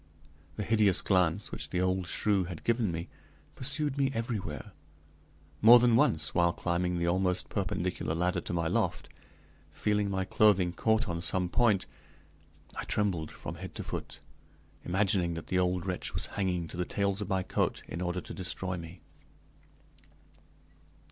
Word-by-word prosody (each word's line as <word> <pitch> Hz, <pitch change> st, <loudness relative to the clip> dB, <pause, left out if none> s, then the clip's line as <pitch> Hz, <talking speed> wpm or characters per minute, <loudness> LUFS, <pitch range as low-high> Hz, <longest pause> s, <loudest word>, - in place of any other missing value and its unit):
The 105 Hz, -, -3 dB
hideous 105 Hz, -4 st, +4 dB
glance 90 Hz, 0 st, +1 dB
which -, -, -3 dB
the 90 Hz, -, -1 dB
old 95 Hz, -1 st, 0 dB
shrew 100 Hz, -1 st, +1 dB
had 85 Hz, -2 st, -8 dB
given 115 Hz, -4 st, +1 dB
me 85 Hz, +1 st, -4 dB, 0.5 s
pursued 140 Hz, +1 st, 0 dB
me 135 Hz, -1 st, +3 dB
everywhere. 110 Hz, -, -4 dB, 0.9 s
More 115 Hz, +3 st, +10 dB
than 120 Hz, -1 st, +4 dB
once, 115 Hz, -, +2 dB
while 85 Hz, -1 st, +3 dB
climbing 90 Hz, 0 st, -1 dB
the 85 Hz, -, 0 dB
almost 90 Hz, +1 st, 0 dB
perpendicular 90 Hz, -5 st, -2 dB
ladder 90 Hz, +2 st, 0 dB
to -, -, -6 dB
my 85 Hz, -1 st, 0 dB
loft, -, -, -1 dB, 0.6 s
feeling 105 Hz, -1 st, 0 dB
my 95 Hz, -1 st, -1 dB
clothing 95 Hz, -4 st, +3 dB
caught 110 Hz, +3 st, +1 dB
on 85 Hz, -1 st, -3 dB
some 90 Hz, +1 st, 0 dB
point, 105 Hz, -3 st, +2 dB, 0.9 s
I -, -, -4 dB
trembled 90 Hz, -7 st, 0 dB
from 75 Hz, -, -7 dB
head 95 Hz, -, -8 dB
to -, -, -5 dB
foot, -, -, -6 dB, 0.6 s
imagining 95 Hz, -2 st, +1 dB
that 85 Hz, -, -6 dB
the 90 Hz, -, +2 dB
old 90 Hz, -1 st, 0 dB
wretch 90 Hz, -2 st, -4 dB
was -, -, +1 dB
hanging 90 Hz, -4 st, -1 dB
to -, -, -7 dB
the 90 Hz, -, 0 dB
tails 100 Hz, +1 st, -1 dB
of 100 Hz, -, -4 dB
my 95 Hz, -2 st, +1 dB
coat -, -, -1 dB
in 85 Hz, -, -5 dB
order 90 Hz, 0 st, -2 dB
to -, -, -9 dB
destroy 95 Hz, 0 st, -2 dB
me. 85 Hz, +1 st, -10 dB
95 Hz, 160 wpm, -30 LUFS, 85-105 Hz, 0.9 s, More